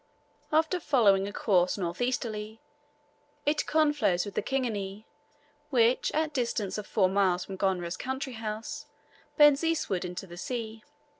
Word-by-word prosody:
After 320 Hz, +4 st, +2 dB
following 205 Hz, -, +3 dB
a -, -, -5 dB
course 185 Hz, -4 st, +2 dB
north 175 Hz, 0 st, -3 dB
easterly, 220 Hz, -3 st, -2 dB, 0.9 s
it 295 Hz, +1 st, +1 dB
conflows 295 Hz, -, +2 dB
with 205 Hz, -, -7 dB
the -, -, 0 dB
Kingani, 215 Hz, -6 st, -3 dB, 0.6 s
which, 245 Hz, -3 st, +3 dB
at 310 Hz, 0 st, 0 dB
distance 220 Hz, -6 st, -1 dB
of 205 Hz, -, -8 dB
four 195 Hz, -4 st, +3 dB
miles 185 Hz, -2 st, +1 dB
from 195 Hz, -, -7 dB
Gonera's 185 Hz, -3 st, -1 dB
country 265 Hz, 0 st, -4 dB
house; 225 Hz, +7 st, -5 dB, 0.5 s
bends 295 Hz, 0 st, +6 dB
eastward 315 Hz, -, 0 dB
into 180 Hz, +1 st, -5 dB
the 175 Hz, -2 st, -11 dB
sea. 225 Hz, -1 st, -5 dB
220 Hz, 140 wpm, -29 LUFS, 195-275 Hz, 0.9 s, bends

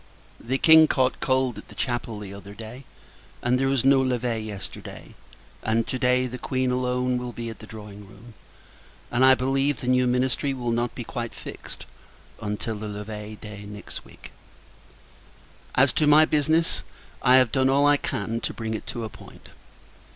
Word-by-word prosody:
The 130 Hz, +3 st, -1 dB
King 160 Hz, +2 st, +8 dB
caught 130 Hz, -3 st, +1 dB
cold 130 Hz, -2 st, +1 dB
at -, -, -13 dB
the -, -, -14 dB
Chapel 120 Hz, -3 st, -2 dB
the 100 Hz, -2 st, -7 dB
other 100 Hz, +1 st, -10 dB
day, 115 Hz, +5 st, -9 dB, 0.6 s
and 125 Hz, +1 st, +2 dB
there 135 Hz, -, +2 dB
was 135 Hz, -2 st, +1 dB
no 135 Hz, 0 st, +6 dB
levee 125 Hz, -3 st, 0 dB
yesterday; 105 Hz, -3 st, -8 dB, 0.5 s
and, 115 Hz, +1 st, +1 dB
to 130 Hz, -, -3 dB
day, 125 Hz, 0 st, +3 dB
the 125 Hz, 0 st, -6 dB
Queen 130 Hz, 0 st, -1 dB
alone 125 Hz, 0 st, 0 dB
will 125 Hz, 0 st, -5 dB
be 115 Hz, -1 st, -5 dB
at 115 Hz, -, -12 dB
the 110 Hz, -, -11 dB
drawing 105 Hz, -2 st, -10 dB
room: 105 Hz, +4 st, -15 dB, 0.8 s
and, 125 Hz, -, +2 dB
I 130 Hz, 0 st, +8 dB
believe, 135 Hz, +2 st, +1 dB
the 125 Hz, -, -6 dB
new 125 Hz, 0 st, +3 dB
ministry 130 Hz, +2 st, 0 dB
will 120 Hz, -2 st, -2 dB
not 120 Hz, +1 st, -1 dB
be 120 Hz, -, -4 dB
quite 120 Hz, 0 st, -5 dB
fixed, -, -, -9 dB, 0.6 s
until 105 Hz, +1 st, -3 dB
the 105 Hz, +1 st, -5 dB
levee 105 Hz, +1 st, -6 dB
day 105 Hz, -1 st, -9 dB
next 105 Hz, 0 st, -8 dB
week. -, -, -14 dB, 1.4 s
As 135 Hz, +1 st, +4 dB
to 155 Hz, -, +2 dB
my 150 Hz, +1 st, +7 dB
business 155 Hz, +2 st, +2 dB, 0.4 s
I 125 Hz, -, +6 dB
have 130 Hz, -3 st, +5 dB
done 130 Hz, -1 st, +3 dB
all 140 Hz, +1 st, +4 dB
I 145 Hz, 0 st, +5 dB
can 115 Hz, -4 st, -3 dB
to -, -, -4 dB
bring 110 Hz, -1 st, -3 dB
it 110 Hz, -, -5 dB
to 120 Hz, -, -4 dB
a -, -, -3 dB
point. -, -, -15 dB
125 Hz, 180 wpm, -25 LUFS, 110-130 Hz, 1.4 s, King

